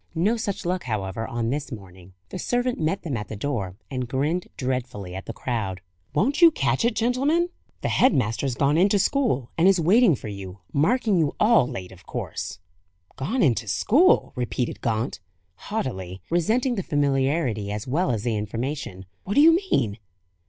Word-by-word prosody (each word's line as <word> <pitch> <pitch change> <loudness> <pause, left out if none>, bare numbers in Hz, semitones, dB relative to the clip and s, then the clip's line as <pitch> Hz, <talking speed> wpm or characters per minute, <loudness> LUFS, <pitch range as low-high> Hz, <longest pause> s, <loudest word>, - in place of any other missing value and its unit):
No 195 +8 +2
such 205 -5 -3
luck, 180 -2 -1
however, 110 -1 -3
on 120 0 -2
this 145 +1 -3
morning. 95 -4 -11 0.2
The 185 - -6
servant 245 +3 0
met 160 +5 -1
them 150 -6 -3
at 105 -2 -4
the 110 - -6
door, 100 -6 -3 0.2
and 130 -2 -3
grinned 150 +7 -1
dreadfully 125 -8 -3
at 95 +1 -7
the - - -3
crowd. 110 -6 -3 0.4
"Won't 270 - +1
you 340 - +10
catch 310 - 0
it, 235 -1 +1
gentlemen! 280 +9 +1 0.3
The - - -1
head 260 - +4
master's 125 - 0
gone 145 +5 +2
into 200 +3 +4
school, 200 - +1
and 170 - +5
is 195 -2 +5
waiting 190 - +5
for 115 - -8
you; 100 -2 -7 0.2
marking 205 - +2
you 155 -3 +1
all 215 - +5
late, 90 -5 -6
of 95 -1 -16
course." - - -5 0.6
"Gone 215 - 0
into 115 -5 +2
school!" 275 - +3
repeated 125 0 -2
Gaunt, 115 0 -1 0.3
haughtily, 95 - -4
resenting 225 +10 +2
the 205 - -1
familiarity, 135 - 0
as 105 +1 -4
well 150 +6 0
as 110 -4 -1
the 120 -2 0
information. 105 -2 -4 0.2
"What 200 - -2
do 285 - +7
you 325 +2 +7 0.2
mean?" 105 -1 +1
135 Hz, 175 wpm, -24 LUFS, -, 0.6 s, you